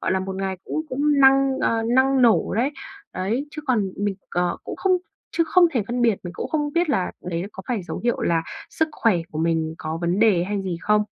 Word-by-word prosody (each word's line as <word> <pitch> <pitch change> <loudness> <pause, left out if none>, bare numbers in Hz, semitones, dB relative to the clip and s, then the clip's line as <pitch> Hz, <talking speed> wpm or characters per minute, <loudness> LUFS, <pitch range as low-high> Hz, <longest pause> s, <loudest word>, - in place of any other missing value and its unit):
gọi - - 0
là, 190 - +1
một 190 0 -5
ngày 190 -1 -2
cũng 315 - -2
cũng 290 +2 +1
năng, 270 0 +5
ờ, 225 0 +1
năng 260 +3 +3
nổ 235 -2 +3
đấy. 245 +6 +1 0.4
Đấy, 225 +10 -2
chứ 305 0 -7
còn 215 -7 +1
mình, 205 -1 -1 0.2
ờ, 175 0 0
cũng - - -6
không 385 - +1 0.4
chứ 330 - +3
không 350 +2 +5
thể 240 -6 +1
phân 240 +2 -1
biệt, 230 -3 +4
mình 175 - -6
cũng - - -4
không 295 -2 -1
biết 345 +1 +1
là 185 -9 0
đấy 170 -1 -2
là 195 - -6
có 190 - -9
phải 230 -6 -1
dấu 175 - -5
hiệu 240 - +1
là 165 -1 +1 0.3
sức 320 - 0
khỏe 225 -9 +2
của 155 - -5
mình 160 -1 0
có 160 +1 -4
vấn 175 +3 0
đề 205 -6 +4
hay 200 +1 -2
gì 185 -3 -3
không. 210 0 +3
220 Hz, 240 wpm, -23 LUFS, 185-270 Hz, 0.4 s, năng